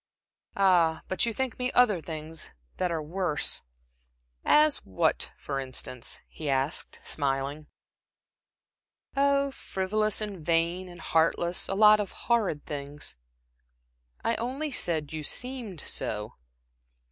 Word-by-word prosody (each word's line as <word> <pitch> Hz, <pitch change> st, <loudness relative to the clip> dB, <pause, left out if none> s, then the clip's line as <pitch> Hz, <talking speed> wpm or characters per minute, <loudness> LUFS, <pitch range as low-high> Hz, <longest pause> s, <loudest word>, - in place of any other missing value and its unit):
"Ah, 175 Hz, -5 st, +4 dB
but 190 Hz, +5 st, 0 dB
you -, -, +1 dB
think 260 Hz, +1 st, -2 dB
me 250 Hz, 0 st, +1 dB
other 215 Hz, -8 st, +4 dB
things 155 Hz, +1 st, -4 dB, 0.3 s
that 180 Hz, -, +1 dB
are 160 Hz, -2 st, -1 dB
worse." 170 Hz, -1 st, -1 dB, 0.8 s
"As 300 Hz, -1 st, +5 dB
what, 95 Hz, -, 0 dB
for 140 Hz, -1 st, -3 dB
instance?" 125 Hz, -2 st, -3 dB
he 155 Hz, -2 st, -5 dB
asked, 135 Hz, +3 st, 0 dB
smiling. 140 Hz, +1 st, -2 dB, 1.5 s
"Oh 280 Hz, 0 st, +3 dB
frivolous, 215 Hz, -2 st, 0 dB
and 205 Hz, -6 st, -4 dB
vain, 170 Hz, +3 st, +1 dB
and 175 Hz, -1 st, -11 dB
heartless. 165 Hz, +2 st, +2 dB
A 195 Hz, -, 0 dB
lot 210 Hz, +1 st, +7 dB
of 205 Hz, -2 st, -3 dB
horrid 215 Hz, -11 st, +1 dB
things." 145 Hz, -, -6 dB, 1.1 s
"I 230 Hz, -, +2 dB
only 270 Hz, +6 st, -2 dB
said 160 Hz, -, 0 dB
you 155 Hz, -, -3 dB
seemed 230 Hz, -, -2 dB
so." 105 Hz, 0 st, -2 dB
175 Hz, 120 wpm, -28 LUFS, 150-215 Hz, 1.5 s, lot